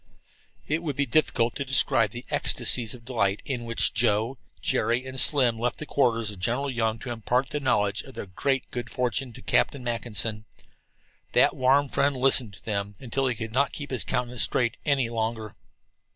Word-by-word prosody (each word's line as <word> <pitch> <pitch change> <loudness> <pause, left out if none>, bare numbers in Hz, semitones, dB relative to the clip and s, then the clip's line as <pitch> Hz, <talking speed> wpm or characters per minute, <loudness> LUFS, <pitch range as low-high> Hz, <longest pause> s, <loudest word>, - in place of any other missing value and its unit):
It 155 +3 0
would 150 -5 -3
be 140 +1 +1
difficult 120 -3 +1
to 140 - -2
describe 125 -4 +3
the 120 +4 -9
ecstacies 120 -2 +1
of 115 -2 -16
delight 105 -5 -1
in 125 -4 -3
which 115 0 +1
Joe, 115 +3 +1 0.2
Jerry 120 +2 0
and 130 0 -5
Slim 125 -5 +3
left 120 +1 -1
the 155 - -6
quarters 115 -7 +1
of 100 - -12
General 125 +8 -1
Young 115 -2 0
to 120 +2 -7
impart 125 +3 -1
the 150 - -2
knowledge 105 -7 +1
of 135 - -13
their - - -5
great 135 +8 -2
good 120 -2 -5
fortune 125 +1 -1
to - - -12
Captain 140 -3 +1
Mackinson. 115 -2 0 0.9
That - - +4
warm 135 +3 +3
friend 140 +1 0
listened 130 -4 +4
to - - -18
them 100 -1 -3
until 135 +2 -1
he 125 - -1
could 110 0 -6
not 140 +2 +1
keep 145 -2 -6
his 130 -5 0
countenance 125 -1 -2
straight 120 -2 +2
any 140 -5 +2
longer. 110 -1 -3
120 Hz, 185 wpm, -26 LUFS, 115-135 Hz, 0.9 s, That